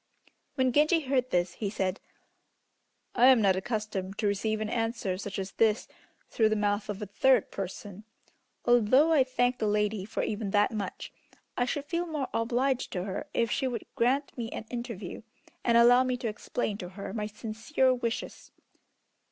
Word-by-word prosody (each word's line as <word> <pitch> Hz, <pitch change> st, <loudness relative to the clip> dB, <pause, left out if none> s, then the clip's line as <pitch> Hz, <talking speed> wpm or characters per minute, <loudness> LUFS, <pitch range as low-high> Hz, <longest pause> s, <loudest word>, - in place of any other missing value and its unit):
When 260 Hz, -2 st, +2 dB
Genji 305 Hz, +5 st, +4 dB
heard 260 Hz, -3 st, 0 dB
this, 175 Hz, -3 st, 0 dB
he 205 Hz, +2 st, -3 dB
said: 190 Hz, -2 st, -2 dB, 1.1 s
"I 245 Hz, +1 st, +5 dB
am 260 Hz, -2 st, +7 dB
not 195 Hz, -3 st, +4 dB
accustomed 200 Hz, -1 st, -3 dB
to 215 Hz, -, -1 dB
receive 215 Hz, +2 st, 0 dB
an 215 Hz, -, -2 dB
answer 225 Hz, -4 st, -1 dB
such 200 Hz, -1 st, -5 dB
as 195 Hz, 0 st, -4 dB
this 220 Hz, -1 st, +2 dB, 0.4 s
through 220 Hz, -2 st, +2 dB
the 215 Hz, -, +1 dB
mouth 205 Hz, 0 st, 0 dB
of 205 Hz, +1 st, -4 dB
a -, -, -3 dB
third 240 Hz, +4 st, +2 dB
person. 195 Hz, +1 st, -6 dB, 0.6 s
Although 245 Hz, +7 st, +5 dB
I 285 Hz, -4 st, +5 dB
thank 250 Hz, -1 st, 0 dB
the 215 Hz, -, 0 dB
lady 210 Hz, -1 st, 0 dB
for 220 Hz, -, -3 dB
even 210 Hz, -1 st, -2 dB
that 205 Hz, +4 st, +3 dB
much, 205 Hz, -4 st, -5 dB, 0.4 s
I 245 Hz, -, +1 dB
should 280 Hz, +3 st, -3 dB
feel 340 Hz, +3 st, -2 dB
more 300 Hz, -5 st, -3 dB
obliged 245 Hz, +3 st, 0 dB
to 180 Hz, -, -2 dB
her 195 Hz, +9 st, -5 dB
if 230 Hz, -2 st, +1 dB
she 265 Hz, -, 0 dB
would 240 Hz, -3 st, -4 dB
grant 265 Hz, +4 st, +1 dB
me 230 Hz, -2 st, -4 dB
an 220 Hz, -, -6 dB
interview, 230 Hz, -6 st, -6 dB, 0.4 s
and 235 Hz, -1 st, +4 dB
allow 245 Hz, +2 st, +7 dB
me 255 Hz, -1 st, -1 dB
to 245 Hz, -2 st, -3 dB
explain 215 Hz, 0 st, -3 dB
to 180 Hz, -, -6 dB
her 200 Hz, -, -6 dB
my 210 Hz, -2 st, -2 dB
sincere 225 Hz, +5 st, 0 dB
wishes." 235 Hz, -2 st, -4 dB
225 Hz, 175 wpm, -29 LUFS, 205-255 Hz, 1.1 s, am